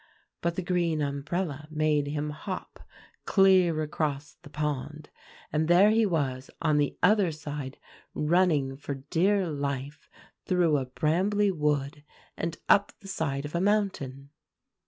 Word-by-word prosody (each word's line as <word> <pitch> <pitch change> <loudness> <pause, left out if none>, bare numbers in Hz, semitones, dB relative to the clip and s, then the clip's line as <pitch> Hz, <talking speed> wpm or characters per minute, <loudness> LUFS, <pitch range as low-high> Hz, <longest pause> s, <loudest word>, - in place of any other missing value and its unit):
But 170 0 -1
the 185 - -2
green 170 -3 0
umbrella 145 +2 -3
made 155 -2 +1
him 150 +1 -2
hop 185 +5 -7 0.5
clear 185 -5 +4
across 150 -1 -3
the 145 - -13
pond; 150 0 -4 0.4
and 155 +1 +1
there 185 +5 +6
he 225 -1 +3
was 135 -7 -2
on 155 -2 +2
the 145 - 0
other 205 -5 +4
side, 145 -3 -6 0.4
running 150 -4 +2
for 140 0 -5
dear 180 +8 +1
life 140 -1 -4 0.4
through 175 -5 +3
a 130 -2 -3
brambly 190 +9 +1
wood, 150 -3 -1 0.3
and 165 0 -3
up 200 0 +4
the 195 - -13
side 145 -7 -2
of 145 - -7
a 170 - 0
mountain." 165 -10 -1
155 Hz, 135 wpm, -28 LUFS, 145-180 Hz, 0.5 s, there